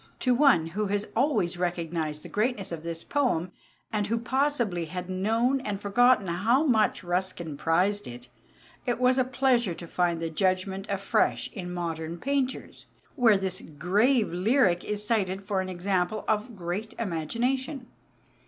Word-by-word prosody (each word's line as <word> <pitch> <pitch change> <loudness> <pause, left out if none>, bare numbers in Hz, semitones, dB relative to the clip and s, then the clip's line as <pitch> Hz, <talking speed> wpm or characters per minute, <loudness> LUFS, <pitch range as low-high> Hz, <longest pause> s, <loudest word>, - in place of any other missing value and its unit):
To 255 - +3
one 255 - +5
who 205 +6 -2
has 205 +1 -1
always 220 - +1
recognized 165 -3 -2
the - - -8
greatness 215 -3 -1
of 165 -2 -5
this 165 0 -5
poem 240 - 0 0.4
and 210 -1 0
who 230 +2 0
possibly 240 - 0
had 180 +3 -6
known 225 +8 +1
and 205 -5 -3
forgotten 240 +2 +4
how 210 - +2
much 220 -9 +2
Ruskin 175 -3 -2
prized 180 +7 +1
it, 120 +1 -9 0.6
it 245 -1 0
was 255 +1 +3
a - - +5
pleasure 250 -6 +1
to 170 - -8
find 170 0 0
the 165 -1 -3
judgement 190 +3 0
afresh 195 0 0
in 180 -2 -6
Modern 165 -1 -4
Painters, 270 +4 -2 0.3
where 230 -7 +5
this 190 -1 -3
grave 205 - +1
lyric 185 -1 +3
is 210 0 -3
cited 195 -3 0
for 195 -2 0
an 185 - -5
example 185 +2 -1
of 220 +2 -1
great 185 +4 -4
imagination. 245 - -2
195 Hz, 155 wpm, -27 LUFS, 175-240 Hz, 0.6 s, one